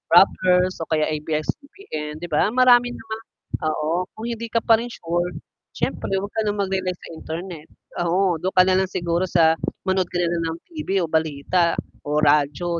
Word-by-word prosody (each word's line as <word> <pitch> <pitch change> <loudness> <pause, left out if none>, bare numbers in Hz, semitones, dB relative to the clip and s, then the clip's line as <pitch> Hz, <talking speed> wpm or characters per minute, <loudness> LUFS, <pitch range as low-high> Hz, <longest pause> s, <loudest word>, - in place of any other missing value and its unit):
Rappler 180 -1 +5
o 165 -3 -6
kaya 155 -1 +2
ABS-CBN, 155 - -4
'di - - -3
ba 150 +5 +3
marami 245 0 +5
namang 220 0 -7 0.5
oo, 160 +4 -1
kung 220 - -7
hindi 230 0 -4
ka 230 0 0
pa 225 -1 +5
rin 240 - -5
sure 175 -3 -2 0.4
siyempre 195 - -1
'wag 200 +1 -4
ka 220 - 0
ng 205 - -1
mag-relay 190 -2 -1
sa - - -12
Internet. 160 0 -7 0.4
Oo, 180 -1 +2
do'n 185 +4 -2
ka 185 - +8
na 185 0 +3
lang 190 - 0
siguro 170 +1 -1
sa 165 -2 +4 0.3
manood 190 -1 +1
ka 175 - -4
na 175 - +2
lang 165 - -1
ng - - -10
TV 195 - -1
o 160 - -4
balita 160 +2 +1 0.3
o 150 +1 +1
radyo 150 +4 +2
180 Hz, 185 wpm, -22 LUFS, 160-195 Hz, 0.5 s, ka